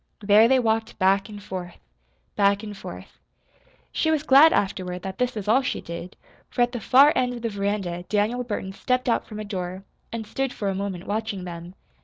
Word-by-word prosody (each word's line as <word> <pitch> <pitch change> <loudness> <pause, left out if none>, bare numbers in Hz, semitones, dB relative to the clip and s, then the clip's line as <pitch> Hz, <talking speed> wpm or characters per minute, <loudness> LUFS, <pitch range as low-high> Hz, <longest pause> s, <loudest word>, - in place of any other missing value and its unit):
There 210 +2 +6
they 265 +2 +4
walked 225 -2 0
back 195 +2 +2
and 205 -1 -9
forth, 180 -3 -6 0.6
back 200 0 +3
and 210 -1 -7
forth. 195 - -10 0.7
She 315 - 0
was 310 -2 +1
glad, 295 +2 +7
afterward, 180 -2 -1
that 190 0 -6
this 250 -1 0
was 210 -2 -5
all 235 +6 +4
she 260 - -2
did, 170 +1 -8 0.3
for 245 - +2
at 240 - 0
the 240 - -4
far 275 +7 +6
end 250 -1 +1
of 240 - -9
the 230 - 0
veranda 200 -4 -2
Daniel 215 +4 +1
Burton 205 -5 -4
stepped 250 +5 -1
out 235 - +1
from 215 -1 -8
a 215 - -5
door, 185 -2 -5 0.3
and 230 -1 -4
stood 270 +4 -2
for 205 -2 -2
a - - -1
moment 190 -2 -4
watching 210 -2 -3
them. 175 0 -8
210 Hz, 205 wpm, -24 LUFS, 190-240 Hz, 0.7 s, glad